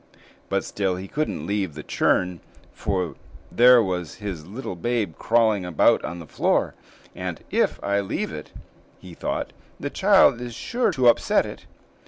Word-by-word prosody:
But - - 0
still 95 -2 -1
he 95 +2 -7
couldn't 150 - -3
leave 95 -5 -2
the 75 - -7
churn, 90 -1 +1 0.3
for 90 -4 -2 0.4
there 125 0 +7
was 90 -4 -3
his 95 -7 -6
little 105 -1 -6
babe 110 -1 -1
crawling 110 -4 +2
about 90 -3 +3
on 85 - -5
the 85 - -9
floor, - - 0 0.4
and - - -5
"if - - +1
I 100 0 +1
leave 100 - -3
it," - - -8 0.5
he 90 -2 -12
thought, - - -3 0.3
"the - - -4
child 120 - +4
is 120 -2 -6
sure 245 - 0
to 130 -7 +2
upset 120 - +4
it." - - -10
100 Hz, 160 wpm, -24 LUFS, 90-120 Hz, 0.5 s, there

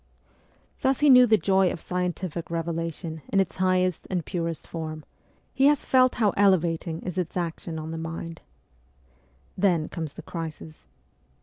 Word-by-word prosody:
Thus 265 +1 +2
he 295 -2 +7
knew 250 -1 +8
the 220 -1 +5
joy 190 +1 +3
of - - -5
scientific 180 -1 -3
revelation 165 -1 -4
in 195 - +1
its 185 -4 0
highest 185 -1 +1
and 180 -4 -2
purest 165 -2 -3
form, 155 -2 -6 0.5
he 270 - +4
has 295 -1 +3
felt 255 -1 +4
how 215 -4 +3
elevating 170 -4 +2
is 185 0 -3
its 180 0 -3
action 165 -1 -4
on 160 0 -5
the 165 - -4
mind. 165 0 -6 1.1
Then 175 -5 +1
comes 160 -4 -5
the - - -10
crisis. 160 -2 -7
170 Hz, 150 wpm, -26 LUFS, 165-190 Hz, 1.1 s, knew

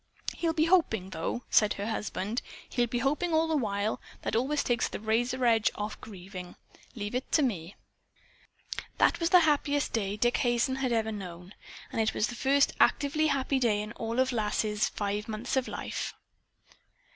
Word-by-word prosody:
"He'll 335 -1 0
be 315 -1 +2
hoping, 225 - +2
though," 165 +8 -3
said 210 -1 +5
her 200 - -4
husband. 215 0 -2 0.3
"He'll 240 -1 +1
be 240 - -2
hoping 300 +7 +1
all 320 +1 +3
the 320 - +1
while. 210 -5 -1 0.2
That - - -1
always 275 +6 +1
takes 240 -2 +1
the - - -5
razor 240 +4 0
edge 225 -2 +4
off 210 +1 -3
of - - -14
grieving. 185 -4 -9 0.4
Leave 205 -1 -4
it 250 +2 -3
to 305 - +5
me." 190 -8 -2 1.2
That - - +3
was 335 -1 +1
the 360 -1 +7
happiest 290 -2 +1
day 205 -2 -1
Dick 240 +3 +2
Hazen 240 +2 +1
had 265 -2 0
ever 220 -1 +1
known. 180 -2 -8 0.4
And 225 - 0
it 220 - 0
was 210 - +1
the - - -5
first 275 +3 +3
actively 305 +2 +3
happy 275 -1 +1
day 225 -5 +2
in 210 0 -4
all 230 0 -4
Lass's 215 -4 +1
five 205 +1 -3
months 220 +4 -3
of 265 -1 +1
life. - - -4
235 Hz, 180 wpm, -29 LUFS, 210-270 Hz, 1.2 s, the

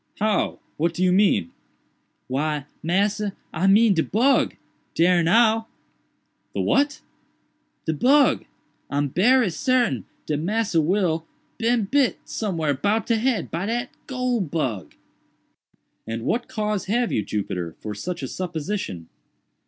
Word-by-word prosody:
"How? 210 0 +1 0.2
what 165 +2 0
do 180 - 0
you 180 - +4
mean?" 185 - +3 0.8
"Why, 145 +2 -1 0.2
massa, 200 +4 0 0.2
I 180 +4 +1
mean 210 +2 +6
de 165 - +2
bug—dare 185 -6 +1
now." 225 +5 +3 0.9
"The - - 0
what?" 285 +1 +1 0.8
"De 160 - 0
bug,—I'm 155 - +1
berry 225 - +3
sartain 240 - +1 0.2
dat 150 -1 -1
Massa 200 0 +1
Will 165 -1 0 0.3
bin 230 -1 +2
bit 270 +3 +2
somewhere 165 -9 -1
'bout 205 +10 0
de 230 - +2
head 240 0 0
by 175 +4 -2
dat 240 +2 -2 0.2
goole 255 -3 -1
bug." 130 - -3 1.1
"And 115 0 -4
what 240 - -1
cause 210 -2 -2
have 235 +4 0
you, 105 - 0
Jupiter, 90 -5 -3
for 105 - -5
such 170 - -5
a - - -2
supposition?" 170 - -4
190 Hz, 125 wpm, -23 LUFS, 155-225 Hz, 1.1 s, mean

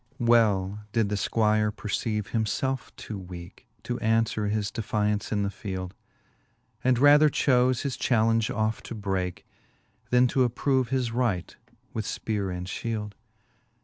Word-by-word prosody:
XXIV. 120 - -1
Well 105 -4 +3
did 110 -3 +2
the 105 - 0
Squire 105 +1 +2
perceive 105 0 -3
him 110 -1 0
felfe 130 +5 -2
too 105 -3 -7
weake, 90 0 -10 0.2
To 120 +2 -3
aunfwere 115 -1 +1
his 105 -1 -1
defiaunce 105 -2 -1
in 105 -2 +1
the 100 - -1
field. 95 -3 -5 0.9
And 125 -1 +3
rather 145 +3 +7
chofe 125 -3 +2
his 140 -3 -2
challenge 115 -2 +2
off 110 +1 -1
to 115 - -5
breake. 95 -4 -3 0.6
Then 125 +1 +5
to 130 - +3
approve 125 +1 +1
his 130 -3 0
right 115 -8 -1 0.4
with 110 -2 -3
fpeare 100 -4 -2
and 90 0 -4
fhield. 105 +1 -4
110 Hz, 150 wpm, -27 LUFS, 100-120 Hz, 0.9 s, rather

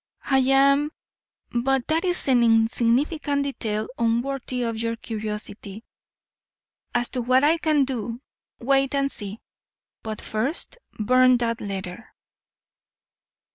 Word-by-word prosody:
"I 270 -1 +3
am 275 +3 +4 0.6
But 255 +1 +1
that 320 +1 +1
is 355 -4 0
an 255 -3 +4
insignificant 240 +6 +2
detail 220 -6 -2
unworthy 245 +2 -1
of 230 -1 -2
your 230 0 -1
curiosity. 210 -2 -6 1.1
As 240 0 +1
to 255 - -3
what 255 +3 +3
I 320 +3 +4
can 305 -4 +2
do, 235 -3 -4 0.4
wait 275 +2 +1
and 275 0 +1
see. 205 +1 -6 0.6
But 220 -1 -5
first 265 - -2 0.2
burn 255 +3 +4
that 230 -1 -2
letter." 195 +1 -6
245 Hz, 115 wpm, -24 LUFS, 225-275 Hz, 1.1 s, am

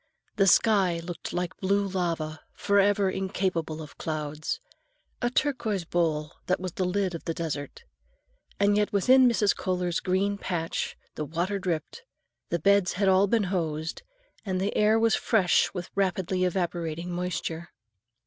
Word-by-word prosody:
The 195 - +4
sky 190 -4 +4
looked 170 +1 -6
like 180 -1 -3
blue 200 +1 +1
lava, 165 -4 -2 0.2
forever 200 0 +3
incapable 180 -5 -2
of 150 - -14
clouds,—a 200 - -5
turquoise 235 - 0
bowl 160 -3 0
that 185 - +1
was 185 0 -4
the 185 - -2
lid 185 0 0
of 165 - -7
the 165 - -2
desert. 145 -4 -5 0.8
And 205 0 +4
yet 210 0 +1
within 255 +6 +5
Mrs. 210 -3 +2
Kohler's 180 -2 -1
green 200 +2 0
patch 165 -4 -3 0.2
the 150 - -4
water 175 +7 -2
dripped, 175 - -3 0.5
the 170 - +1
beds 200 +2 +3
had 200 +1 0
all 190 +1 +5
been 225 +1 +2
hosed, 160 -2 -2 0.4
and 185 -3 -2
the 195 +2 -1
air 215 +1 +4
was 225 0 +3
fresh 200 -6 +3
with 180 -2 -6
rapidly 185 -1 0
evaporating 175 -2 -2
moisture. 175 -1 -3
185 Hz, 145 wpm, -27 LUFS, 170-200 Hz, 0.8 s, within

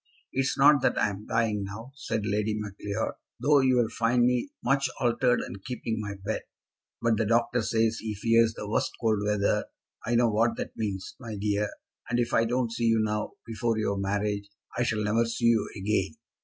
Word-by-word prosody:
"It - - -1
is 135 +2 +1
not 140 0 +6
that - - +2
I 105 - +2
am 100 +2 -9
dying 110 -3 +1
now," 110 +6 -7
said 120 -6 -3
Lady 105 +1 0
Macleod, 105 0 -3 0.3
"though 145 0 +4
you 130 -1 +3
will 120 -2 +2
find 120 +1 +2
me 125 +2 +1
much 135 +1 +2
altered 125 0 +2
and 95 - -8
keeping 120 -3 -3
my 105 -1 -5
bed. 110 - -1 0.6
But 115 -1 +3
the 110 - +1
doctor 120 +1 +2
says 115 0 +1
he 110 -1 -4
fears 115 +1 +3
the 105 - -6
first - - +1
cold 110 -3 +2
weather. 105 -1 +1 0.4
I 120 +2 0
know 120 -1 +4
what 115 +2 +2
that - - -5
means, 100 -4 -3
my 115 -4 -6
dear; 105 0 0 0.4
and 120 - +1
if 120 0 0
I 115 - +4
don't 120 0 0
see 115 0 -1
you 115 -1 +4
now, 105 0 -1
before 115 0 -1
your 100 -2 0
marriage, 100 +1 -1 0.3
I - - -1
shall 110 -3 0
never 110 +3 +2
see 115 +1 -2
you 115 -2 +3
again. 100 +1 0
115 Hz, 200 wpm, -28 LUFS, 105-120 Hz, 0.6 s, not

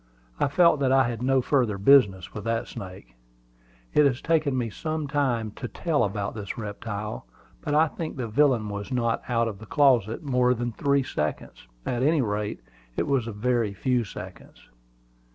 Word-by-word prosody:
I - - +3
felt 170 +1 +4
that 135 -2 +2
I 135 -2 +4
had 120 -1 -4
no 130 0 +2
further 120 -8 +1
business 100 -5 +4
with 105 - -6
that 115 0 -1
snake. 95 - -9 0.8
It 150 - +5
has 130 -2 -1
taken 155 -5 +1
me 115 -3 -2
some 155 - -3
time 130 -7 0
to 125 - -6
tell 150 0 0
about 100 -1 -2
this 105 -3 -6
reptile; 105 - -5 0.3
but 145 - -1
I 160 +2 +5
think 155 0 -6
the 125 -3 -3
villain 120 -2 +2
was 100 +4 -6
not 115 -2 0
out 115 -1 +2
of 105 -3 -6
the 110 - -11
closet 125 -3 +3
more 125 -3 +2
than 120 +1 -3
three 140 +3 +1
seconds; 75 - -4 0.2
at 120 -1 -1
any 150 +1 +3
rate, 105 -1 -3 0.4
it - - +1
was 135 -5 0
a - - -3
very 110 -1 0
few 125 +4 +1
seconds. 100 - -11
120 Hz, 180 wpm, -26 LUFS, 105-140 Hz, 0.8 s, It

